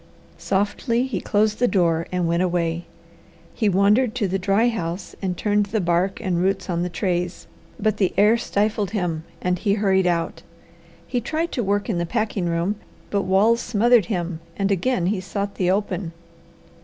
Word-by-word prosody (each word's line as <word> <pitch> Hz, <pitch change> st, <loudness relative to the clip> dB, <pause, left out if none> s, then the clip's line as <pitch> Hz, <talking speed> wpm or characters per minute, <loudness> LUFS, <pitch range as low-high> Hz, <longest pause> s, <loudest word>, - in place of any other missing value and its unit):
Softly 220 Hz, +5 st, 0 dB
he 230 Hz, -9 st, -3 dB
closed 210 Hz, +1 st, +1 dB
the 245 Hz, -, +4 dB
door 170 Hz, -6 st, +1 dB
and 180 Hz, -2 st, 0 dB
went 170 Hz, +1 st, +1 dB
away. 170 Hz, -2 st, 0 dB, 0.7 s
He 215 Hz, -4 st, +1 dB
wandered 210 Hz, +5 st, +3 dB
to 220 Hz, -5 st, 0 dB
the 190 Hz, +1 st, -1 dB
dry 200 Hz, +5 st, +2 dB
house 180 Hz, -5 st, -3 dB
and 185 Hz, -3 st, -2 dB
turned 205 Hz, -1 st, +1 dB
the 215 Hz, +2 st, -1 dB
bark 175 Hz, +1 st, +1 dB
and 185 Hz, -5 st, -1 dB
roots 190 Hz, 0 st, 0 dB
on 170 Hz, 0 st, 0 dB
the 180 Hz, -, -1 dB
trays, 180 Hz, -1 st, -2 dB, 0.3 s
but 215 Hz, -1 st, +1 dB
the 190 Hz, -4 st, +2 dB
air 210 Hz, +3 st, +6 dB
stifled 210 Hz, -3 st, 0 dB
him 165 Hz, -4 st, -2 dB, 0.2 s
and 180 Hz, -1 st, 0 dB
he 200 Hz, 0 st, +1 dB
hurried 190 Hz, -3 st, +2 dB
out. 170 Hz, -1 st, -1 dB, 0.6 s
He 245 Hz, -, -2 dB
tried 320 Hz, +7 st, -2 dB
to 245 Hz, -, -1 dB
work 205 Hz, 0 st, 0 dB
in 200 Hz, -7 st, -1 dB
the 170 Hz, -, -1 dB
packing 215 Hz, -4 st, -1 dB
room, 170 Hz, +5 st, 0 dB, 0.3 s
but 200 Hz, -1 st, 0 dB
walls 215 Hz, +5 st, +4 dB
smothered 235 Hz, -1 st, +3 dB
him 175 Hz, -6 st, -2 dB, 0.2 s
and 195 Hz, 0 st, 0 dB
again 195 Hz, 0 st, +1 dB
he 190 Hz, +1 st, 0 dB
sought 200 Hz, +2 st, -3 dB
the 180 Hz, -2 st, 0 dB
open. 190 Hz, -3 st, -1 dB
195 Hz, 180 wpm, -23 LUFS, 180-215 Hz, 0.7 s, air